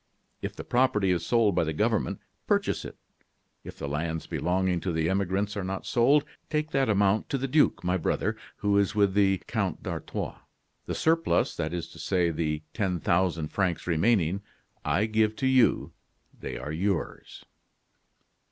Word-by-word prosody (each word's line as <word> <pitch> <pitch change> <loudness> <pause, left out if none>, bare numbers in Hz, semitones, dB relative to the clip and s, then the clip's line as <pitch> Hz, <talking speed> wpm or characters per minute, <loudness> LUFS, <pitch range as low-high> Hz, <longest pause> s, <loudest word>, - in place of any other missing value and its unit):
If - - -4
the - - -7
property 105 -6 +2
is 85 -2 0
sold 115 -4 +3
by - - +2
the 80 0 -2
government, 75 - 0 0.3
purchase - - +1
it; - - -9 0.7
if - - -10
the - - -5
lands 80 +3 -2
belonging 90 0 0
to 90 - -2
the 80 -1 0
emigrants 100 +2 0
are 100 - -2
not 95 +1 -4
sold, 140 +5 +3 0.2
take 155 0 -1
that 135 -2 +2
amount 100 0 +2
to 140 - 0
the 135 +1 -2
duke, 150 +3 +3
my 90 +1 +1
brother, 80 - -1 0.2
who 100 0 +2
is 100 0 +1
with 100 -2 +3
the 95 -1 +3
Count - - -2
d'Artois. - - -4 0.5
The - - -2
surplus, 165 +1 +2
that 80 - -2
is 85 -1 -3
to - - -13
say, 90 -3 +1
the 75 -1 -2
ten 95 -5 -1
thousand 85 -2 +1
francs 95 -4 -1
remaining, 90 +1 +2 0.4
I 105 - +1
give 110 0 +1
to 130 - -2
you 130 -2 +3 0.4
they - - -6
are 75 - -5
yours. 90 +2 -3
95 Hz, 170 wpm, -27 LUFS, 85-110 Hz, 0.7 s, sold